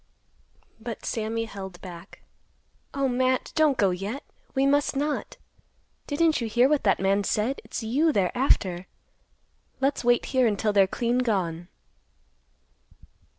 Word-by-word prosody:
But 230 Hz, 0 st, -7 dB
Sammy 225 Hz, 0 st, -2 dB
held 190 Hz, -4 st, -8 dB
back. 180 Hz, 0 st, -11 dB, 0.7 s
"Oh, 275 Hz, -1 st, 0 dB
Matt, 255 Hz, 0 st, 0 dB
don't 305 Hz, -4 st, +3 dB
go 200 Hz, -4 st, +3 dB
yet. 200 Hz, +9 st, -4 dB, 0.3 s
We 270 Hz, +1 st, +3 dB
must 285 Hz, +1 st, +2 dB
not. 295 Hz, -, -2 dB, 0.7 s
Didn't 315 Hz, -1 st, +2 dB
you 230 Hz, -, -1 dB
hear 240 Hz, +4 st, +4 dB
what 295 Hz, 0 st, +2 dB
that 195 Hz, -, +3 dB
man 195 Hz, +1 st, +2 dB
said? 220 Hz, +7 st, -1 dB
It's -, -, -6 dB
you 285 Hz, +9 st, +2 dB
they're 195 Hz, -7 st, 0 dB
after. 185 Hz, -8 st, +1 dB, 0.9 s
Let's 275 Hz, 0 st, 0 dB
wait 240 Hz, 0 st, +3 dB
here 255 Hz, -2 st, +4 dB
until 210 Hz, 0 st, 0 dB
they're 195 Hz, -2 st, +5 dB
clean 240 Hz, +5 st, 0 dB
gone." 180 Hz, -8 st, -1 dB
235 Hz, 135 wpm, -26 LUFS, 195-270 Hz, 0.9 s, they're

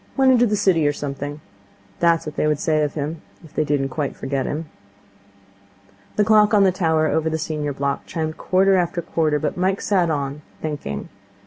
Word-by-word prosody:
Went 265 Hz, -1 st, +5 dB
into 245 Hz, -1 st, +4 dB
the 210 Hz, -, +1 dB
city 185 Hz, -7 st, +3 dB
or 145 Hz, -, +2 dB
something.' 145 Hz, +1 st, -5 dB, 0.6 s
That 170 Hz, -1 st, +5 dB
was 165 Hz, -, -8 dB
what 150 Hz, -, -6 dB
they -, -, +1 dB
would 150 Hz, -1 st, +2 dB
say 155 Hz, -1 st, +1 dB
of 150 Hz, -1 st, -1 dB
him, 155 Hz, +2 st, -4 dB, 0.2 s
if 160 Hz, -, -15 dB
they -, -, +1 dB
didn't 145 Hz, -2 st, 0 dB
quite 140 Hz, +1 st, -3 dB
forget 135 Hz, 0 st, -2 dB
him. 155 Hz, +3 st, -3 dB, 1.5 s
The 210 Hz, -, +3 dB
clock 215 Hz, 0 st, +5 dB
on 200 Hz, -, +6 dB
the 190 Hz, -, +5 dB
tower 160 Hz, -4 st, +1 dB
over 160 Hz, +1 st, +1 dB
the 160 Hz, -, -1 dB
senior 150 Hz, -2 st, -3 dB
block 140 Hz, 0 st, -2 dB
chimed 160 Hz, -1 st, -3 dB
quarter 190 Hz, +1 st, +3 dB
after 175 Hz, -1 st, -1 dB
quarter, 155 Hz, -2 st, +1 dB
but 150 Hz, +3 st, -2 dB
Mike 190 Hz, +2 st, +1 dB
sat 185 Hz, -5 st, +1 dB
on, 145 Hz, -1 st, -2 dB, 0.2 s
thinking. 145 Hz, -, -5 dB
155 Hz, 200 wpm, -22 LUFS, 145-185 Hz, 1.5 s, on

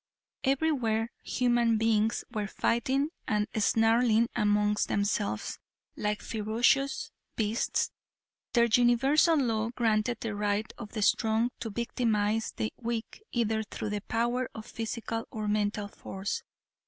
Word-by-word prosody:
Everywhere 255 Hz, -6 st, +1 dB
human 240 Hz, -2 st, +2 dB
beings 220 Hz, 0 st, +2 dB
were 210 Hz, -3 st, -2 dB
fighting 265 Hz, +7 st, +1 dB, 0.2 s
and 210 Hz, -1 st, +1 dB
snarling 225 Hz, +2 st, +3 dB
amongst 210 Hz, 0 st, +2 dB
themselves 155 Hz, -, -1 dB, 0.4 s
like 210 Hz, 0 st, -2 dB
ferocious 235 Hz, +5 st, +1 dB, 0.2 s
beasts. 220 Hz, +1 st, 0 dB, 0.6 s
Their 235 Hz, -1 st, +5 dB
universal 250 Hz, +7 st, +4 dB
law 225 Hz, -5 st, +1 dB
granted 230 Hz, -1 st, +1 dB
the 225 Hz, -2 st, -2 dB
right 205 Hz, +1 st, -1 dB
of 215 Hz, -3 st, -8 dB
the 215 Hz, -3 st, -1 dB
strong 225 Hz, +3 st, +2 dB
to 225 Hz, -, -4 dB
victimize 220 Hz, -1 st, 0 dB
the 110 Hz, -1 st, -2 dB
weak 235 Hz, -, -4 dB
either 225 Hz, -2 st, +1 dB
through 215 Hz, 0 st, -5 dB
the 205 Hz, -1 st, -2 dB
power 240 Hz, +4 st, -1 dB
of 220 Hz, -, -7 dB
physical 225 Hz, -1 st, -4 dB
or 215 Hz, -1 st, -4 dB
mental 210 Hz, 0 st, 0 dB
force. 195 Hz, 0 st, -5 dB
225 Hz, 120 wpm, -29 LUFS, 210-240 Hz, 0.6 s, Their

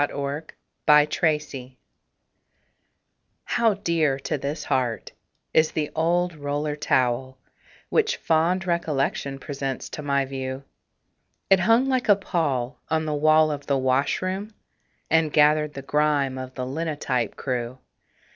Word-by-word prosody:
THE 145 Hz, -, 0 dB
OLD 145 Hz, +3 st, -4 dB, 0.4 s
ROLLER 150 Hz, -1 st, +7 dB
TOWEL 150 Hz, -5 st, -2 dB, 1.7 s
How 230 Hz, -4 st, +2 dB
dear 165 Hz, -8 st, +1 dB
to 135 Hz, +3 st, -3 dB
this 145 Hz, +2 st, -4 dB
heart 120 Hz, -4 st, -1 dB, 0.4 s
is 160 Hz, 0 st, +3 dB
the 150 Hz, -2 st, -2 dB
old 175 Hz, +2 st, +1 dB
roller 145 Hz, 0 st, -2 dB
towel 130 Hz, -2 st, 0 dB, 0.5 s
Which 460 Hz, +1 st, +1 dB
fond 170 Hz, +4 st, +1 dB
recollection 145 Hz, -5 st, -1 dB
presents 135 Hz, -1 st, -5 dB
to -, -, -6 dB
my 140 Hz, -1 st, +1 dB
view. 130 Hz, 0 st, -5 dB, 0.9 s
It 195 Hz, -, +7 dB
hung 230 Hz, +8 st, +3 dB
like 255 Hz, -4 st, 0 dB
a 205 Hz, -, +8 dB
pall 145 Hz, -10 st, -2 dB
on 160 Hz, 0 st, 0 dB
the 155 Hz, -, -1 dB
wall 155 Hz, +1 st, +4 dB
of 145 Hz, -1 st, -6 dB
the 140 Hz, -, +2 dB
washroom, 185 Hz, +11 st, -1 dB, 0.6 s
And 160 Hz, -1 st, +3 dB
gathered 150 Hz, 0 st, +3 dB
the 140 Hz, -, -6 dB
grime 145 Hz, -2 st, +1 dB
of 130 Hz, 0 st, -8 dB
the 130 Hz, -, -3 dB
linotype 140 Hz, -4 st, -2 dB
crew. 125 Hz, -1 st, -3 dB
150 Hz, 130 wpm, -24 LUFS, 135-165 Hz, 1.7 s, a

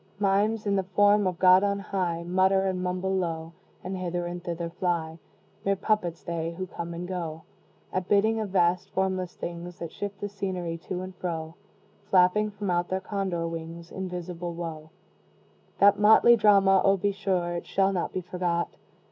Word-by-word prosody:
Mimes, 205 Hz, +2 st, +1 dB
in 200 Hz, -1 st, +1 dB
the -, -, +3 dB
form 205 Hz, +2 st, +3 dB
of 180 Hz, -2 st, -2 dB
God 185 Hz, +1 st, +6 dB
on 200 Hz, 0 st, +1 dB
high, 180 Hz, -4 st, -2 dB
Mutter 190 Hz, +2 st, +2 dB
and 185 Hz, -1 st, -1 dB
mumble 185 Hz, +1 st, -1 dB
low, 165 Hz, -3 st, -3 dB, 0.3 s
And 185 Hz, +1 st, -4 dB
hither 175 Hz, -1 st, -3 dB
and 175 Hz, 0 st, -5 dB
thither 170 Hz, -1 st, -4 dB
fly; 170 Hz, -2 st, -2 dB, 0.4 s
Mere 195 Hz, -1 st, +2 dB
puppets 180 Hz, -4 st, -1 dB
they, 165 Hz, -1 st, -3 dB
who 185 Hz, -, -3 dB
come 170 Hz, -2 st, -6 dB
and 175 Hz, +1 st, -5 dB
go 165 Hz, -3 st, -4 dB, 0.5 s
At 185 Hz, -1 st, -1 dB
bidding 220 Hz, +2 st, +3 dB
of 215 Hz, -2 st, -3 dB
vast 180 Hz, -1 st, +2 dB
formless 185 Hz, -2 st, -1 dB
things 175 Hz, +1 st, -6 dB
That 170 Hz, -4 st, -6 dB
shift 205 Hz, -1 st, -6 dB
the 205 Hz, -, -3 dB
scenery 185 Hz, -4 st, -4 dB
to 185 Hz, -1 st, -3 dB
and 185 Hz, 0 st, -7 dB
fro, 165 Hz, -3 st, -4 dB, 0.6 s
Flapping 190 Hz, +3 st, +4 dB
from 205 Hz, -2 st, -3 dB
out 175 Hz, 0 st, +1 dB
their 190 Hz, -, -1 dB
condor 190 Hz, -4 st, -2 dB
wings 165 Hz, +1 st, -7 dB
Invisible 180 Hz, -2 st, -5 dB
Wo! 160 Hz, -2 st, -6 dB, 0.9 s
That 200 Hz, 0 st, +5 dB
motley 220 Hz, +3 st, +7 dB
drama! 195 Hz, -3 st, +5 dB
oh, 195 Hz, 0 st, +4 dB
be 200 Hz, +2 st, 0 dB
sure 185 Hz, -3 st, -1 dB
It 170 Hz, -, -5 dB
shall 195 Hz, 0 st, +2 dB
not 180 Hz, -, -2 dB
be 185 Hz, -, -3 dB
forgot! 175 Hz, -1 st, -1 dB
185 Hz, 175 wpm, -27 LUFS, 170-195 Hz, 0.9 s, motley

